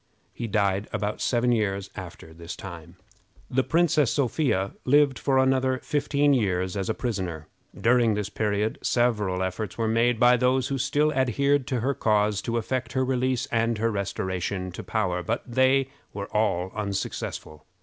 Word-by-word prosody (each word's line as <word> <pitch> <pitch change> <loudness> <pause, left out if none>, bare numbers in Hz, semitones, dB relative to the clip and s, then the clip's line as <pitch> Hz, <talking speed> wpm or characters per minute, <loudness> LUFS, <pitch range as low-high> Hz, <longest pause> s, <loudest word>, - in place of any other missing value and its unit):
He 120 - -4
died 100 -1 0
about 105 +1 -3
seven 120 0 +2
years 100 -4 -1
after 85 -4 -9
this 85 +2 -8
time. 85 -2 -10 0.6
The 130 +1 +3
Princess 155 -5 +2
Sophia 125 -8 0
lived 140 0 +3
for 130 -1 +2
fifteen 145 0 +2
years 95 -6 0
a 95 -2 -1
prisoner. 90 - -3 0.3
During 120 -2 +3
this 105 -1 -2
period 105 +1 -1
several 105 -7 +1
efforts 95 +1 -4
were 115 -1 0
made 115 +1 +2
by 125 0 +6
those 130 +1 +1
who 135 -1 -2
still 150 +4 +1
adhered 135 +1 +1
to 125 -4 -1
her 135 +4 +1
cause 105 -3 +1
to 115 +1 -2
effect 120 +1 -2
her 130 0 +1
release 130 -1 0
and 115 0 +1
her 115 +2 0
restoration 95 -2 -3
to 90 - -8
power, 90 -5 -1
but 110 +6 -2
they 130 +2 +3 0.3
were 100 0 -6
all 95 -4 +1
unsuccessful. 100 -6 -4
115 Hz, 155 wpm, -26 LUFS, 100-130 Hz, 0.6 s, by